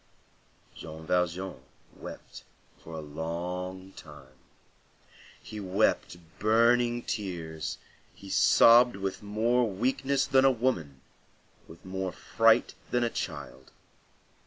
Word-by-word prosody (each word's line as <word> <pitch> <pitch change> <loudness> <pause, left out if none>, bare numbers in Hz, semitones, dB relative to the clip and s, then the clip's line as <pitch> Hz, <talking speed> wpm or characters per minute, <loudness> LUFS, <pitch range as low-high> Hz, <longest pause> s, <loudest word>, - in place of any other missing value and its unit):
Jean 80 +1 -9
Valjean 90 -2 -1 0.3
wept - - -10 0.4
for 80 - -12
a 80 - -5
long 90 +5 -5
time. 75 -7 -14 1.1
He 105 - -9
wept 95 -2 0 0.2
burning 120 +2 +3
tears, 80 -7 -4 0.4
he 100 - -13
sobbed 120 +4 +6
with 95 -1 -4
more 115 +3 +1
weakness 130 +6 0
than 130 0 +4
a 135 - +6
woman, 110 - -1 0.7
with 85 - -15
more 95 0 -3
fright 115 +6 +2 0.2
than 120 0 +1
a 120 - 0
child. 65 0 -6
95 Hz, 105 wpm, -28 LUFS, 85-115 Hz, 1.1 s, sobbed